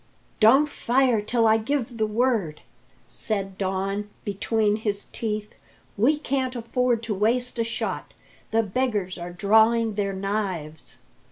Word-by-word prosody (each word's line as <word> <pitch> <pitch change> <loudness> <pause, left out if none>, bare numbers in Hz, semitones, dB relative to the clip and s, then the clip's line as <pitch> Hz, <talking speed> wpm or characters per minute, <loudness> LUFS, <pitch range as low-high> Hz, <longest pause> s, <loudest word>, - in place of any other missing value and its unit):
"Don't 265 +7 +6
fire 250 -4 +2
till 230 +2 +1
I 220 0 +5
give 240 0 -2
the 215 - +2
word," 215 -8 0 0.5
said 195 -3 -3
Don 195 +2 -2 0.2
between 210 +1 +1
his 205 -2 -3
teeth. 210 -2 -3 0.4
"We 255 +9 +3
can't 265 -3 -2
afford 240 0 0
to 225 -2 -2
waste 240 +5 0
a - - +3
shot. 225 -1 -4 0.3
The 225 +1 +2
beggars 205 -4 -1
are 175 +1 -6
drawing 220 +4 +3
their 200 -1 -1
knives." 190 -6 -4
220 Hz, 135 wpm, -25 LUFS, 200-235 Hz, 0.5 s, Don't